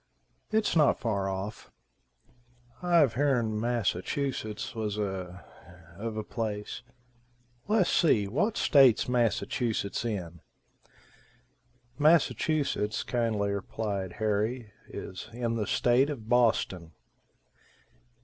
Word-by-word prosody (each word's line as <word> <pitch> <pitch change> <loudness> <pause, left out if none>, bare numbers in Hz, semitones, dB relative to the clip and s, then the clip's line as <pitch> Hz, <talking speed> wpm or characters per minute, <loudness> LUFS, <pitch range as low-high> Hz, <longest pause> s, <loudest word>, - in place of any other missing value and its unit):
"It's 215 -4 +1
not 150 -3 +4
far 100 -4 -1
off." 95 +3 -5 1.1
"I've 170 -8 +4
heern 120 -6 +1
Massachusetts 115 0 -2
was 105 -2 -3
a 95 -3 -4 0.5
of 110 +3 -5
a 110 - -2
place. 105 -2 -4 0.9
Les, 210 -4 +3
see, 110 - +3
what 205 - 0
state's 135 -6 +5
Massachusetts 120 -3 0
in?" 90 -8 -4 1.6
"Massachusetts," 150 -7 +2
kindly 110 -4 0
replied 100 -2 -3
Harry, 110 +1 -1
"is 95 - -8
in 115 -1 -2
the 110 -3 -2
state 125 +4 +3
of 120 -7 -6
Boston." 110 -8 +1
115 Hz, 90 wpm, -29 LUFS, 100-130 Hz, 1.6 s, state's